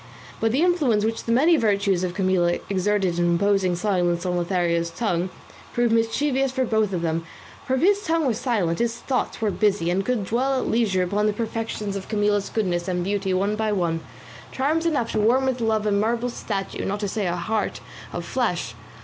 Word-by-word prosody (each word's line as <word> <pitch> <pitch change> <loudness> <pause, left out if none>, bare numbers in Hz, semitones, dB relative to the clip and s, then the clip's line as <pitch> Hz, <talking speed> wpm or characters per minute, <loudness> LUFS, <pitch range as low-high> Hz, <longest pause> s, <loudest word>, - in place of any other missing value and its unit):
But 225 0 +1
the 275 +7 +2
influence 285 -13 +2
which 225 0 -2
the 230 - -1
many 310 +8 +5
virtues 200 -5 +1
of 180 -1 -2
Camilla 185 -3 +2
exerted 190 -2 +1
in 175 - +2
imposing 185 +1 +2
silence 175 -2 0
on 180 -1 0
Lothario's 170 -1 0
tongue 180 -1 -1 0.4
proved 240 -1 +2
mischievous 265 +4 +1
for 260 0 0
both 220 -3 +1
of 175 -3 -2
them, 165 0 -1 0.4
for 260 - +2
if 260 - -1
his 405 +3 +3
tongue 325 -3 +1
was 240 -5 0
silent 195 -10 0
his 235 0 0
thoughts 255 -2 -2
were 215 -2 +1
busy, 190 -5 +1
and 190 +2 +1
could 235 -3 -1
dwell 260 +5 +1
at - - -2
leisure 205 -6 +2
upon 205 +4 0
the 210 - +1
perfections 220 -2 -3
of 195 -1 -5
Camilla's 205 -2 +1
goodness 180 -5 -1
and 180 -1 -1
beauty 195 0 -1
one 200 +3 +1
by 215 0 0
one, 170 -5 0 0.5
charms 310 +5 0
enough 280 -8 0
to - - 0
warm 250 +5 +3
with 255 -2 -1
love 220 -1 +1
a 210 - +1
marble 230 +4 +1
statue, 195 -4 -4
not 205 +1 -2
to 205 - -1
say 200 0 -2
a 175 - 0
heart 205 +5 -2 0.3
of 175 -1 -5
flesh. 180 - -1
210 Hz, 200 wpm, -24 LUFS, 185-235 Hz, 0.5 s, many